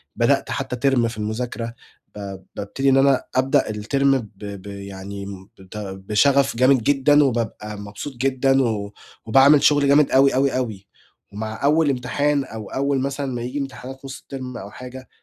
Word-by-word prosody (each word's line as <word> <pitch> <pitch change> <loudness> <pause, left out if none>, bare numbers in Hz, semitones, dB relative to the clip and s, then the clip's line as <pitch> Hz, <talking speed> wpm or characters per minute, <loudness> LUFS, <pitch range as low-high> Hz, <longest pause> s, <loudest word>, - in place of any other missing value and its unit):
بدأت - - +1
حتّى 125 +2 -1
Term 120 -3 +2
في 115 -1 -7
المذاكرة 115 +2 -4 0.4
ب 100 -2 -6 0.2
بابتدي 135 +7 -1
إن 135 - +4
أنا 135 -1 +3
أبدأ 130 -4 +2
الTerm 125 +7 -1 0.3
ب 100 -1 -8
ب - - -11
يعني 100 0 -7
م 95 0 -10
بت 95 +2 -11
بشغف 105 +8 +1
جامد 130 -1 +4
جدًا 145 +2 +4
وبابقى 110 -4 -3
مبسوط 105 +7 -7
جدًا 135 +1 +2
و 105 -4 -2 0.3
وباعمل 135 +5 +6
شغل 145 -1 +4
جامد 145 0 +5
أوي، 135 0 +5
أوي، 135 -1 +2
أوي، 105 -6 -4 0.5
ومع 110 +3 -5
أول 150 +2 +3
امتحان 140 +3 0
أو 110 -4 -8
أول 140 0 0
مثلًا 140 +1 -2
ما 120 - -4
ييجي 125 +4 -4
امتحانات 135 0 -7
نُص 135 0 -7
الTerm 130 -2 -6
أو 100 +2 -9
حاجة، 130 +1 -10
125 Hz, 165 wpm, -22 LUFS, 105-135 Hz, 0.5 s, وباعمل